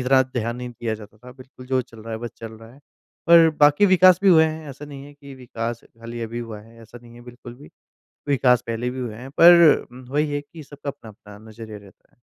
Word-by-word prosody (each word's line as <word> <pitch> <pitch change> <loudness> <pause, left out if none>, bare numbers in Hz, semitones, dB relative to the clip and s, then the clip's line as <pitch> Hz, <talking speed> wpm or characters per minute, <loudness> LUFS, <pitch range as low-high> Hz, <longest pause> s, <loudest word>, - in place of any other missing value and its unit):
इतना 130 +1 +3
ध्यान 120 -2 -4
नहीं 125 0 -7
दिया 115 -2 -4
जाता 105 -1 -13
था, 125 +2 -14
बिल्कुल 130 0 -15
जो 130 0 0
चल 115 -2 -18
रहा 115 +1 -8
है 110 - -4
बस 120 0 -7
चल 115 -1 -9
रहा 115 +1 -15
है। 140 - -21 0.5
और 170 -1 +7
बाकी 145 +7 +5
विकास 185 -1 +5
भी 195 - +4
हुए 160 -3 +6
हैं 155 -1 -5
ऐसा 140 +3 -11
नहीं 140 -2 -11
है 145 - -14
कि 140 -1 -13
विकास 120 -2 -6
खाली 115 +1 -10
अभी 115 +1 -6
हुआ 115 -3 -8
है 115 +2 -18
ऐसा 115 +2 -14
नहीं 120 0 -16
है 120 - -14
बिल्कुल 120 0 -12
भी। 75 -10 -16 0.6
विकास 130 -3 +2
पहले 115 +2 -3
भी 130 +1 -7
हुए 120 -4 -5
हैं 125 +4 -10
पर 170 -2 +7
उम, 125 +1 -13
वहीं 150 +2 -1
है 145 - -2
कि 155 +2 -14
सबका 145 0 -9
अपना-अपना 105 -5 -13
नज़रिया 110 -1 -10
रहता 100 -2 -20
है। - - -44
125 Hz, 245 wpm, -22 LUFS, 115-145 Hz, 0.6 s, और